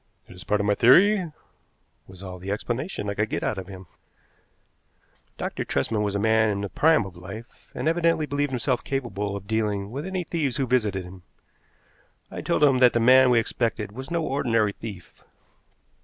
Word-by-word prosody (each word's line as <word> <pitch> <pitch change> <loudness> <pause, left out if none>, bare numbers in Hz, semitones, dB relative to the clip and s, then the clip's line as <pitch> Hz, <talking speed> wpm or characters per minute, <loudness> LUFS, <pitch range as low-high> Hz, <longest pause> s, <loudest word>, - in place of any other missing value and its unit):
"It - - -14
is 90 - -12
part 105 - 0
of 100 - 0
my 105 - +3
theory," 180 - +5 0.8
was 95 0 -13
all 90 -1 -8
the 95 +2 -7
explanation 120 - -3
I 100 - -1
could 105 +1 -1
get - - -3
out 105 - -1
of 95 - -8
him. 95 -1 -10 1.5
Dr. - - -3
Tresman 105 +10 -1
was 100 -1 -1
a - - 0
man 110 +1 +3
in 100 -1 -2
the 100 - -4
prime 150 - +3
of 95 -2 -10
life, 100 +7 -11
and - - -2
evidently 165 -1 +2
believed 145 0 -1
himself 125 0 -1
capable 105 -7 -3
of 100 -1 -7
dealing 105 -2 -1
with 145 +7 -5
any 185 -1 -2
thieves 155 -6 -2
who 135 - 0
visited 110 -7 0
him. 90 +1 -12 1.1
I - - -6
told - - 0
him 135 -3 +5
that 125 -1 +6
the 120 - +2
man 130 +2 +6
we 120 - +4
expected 115 -2 -1
was 130 +5 -8
no 170 -1 -1
ordinary 120 -8 +1
thief. 100 -6 -10
110 Hz, 190 wpm, -25 LUFS, 100-135 Hz, 1.5 s, that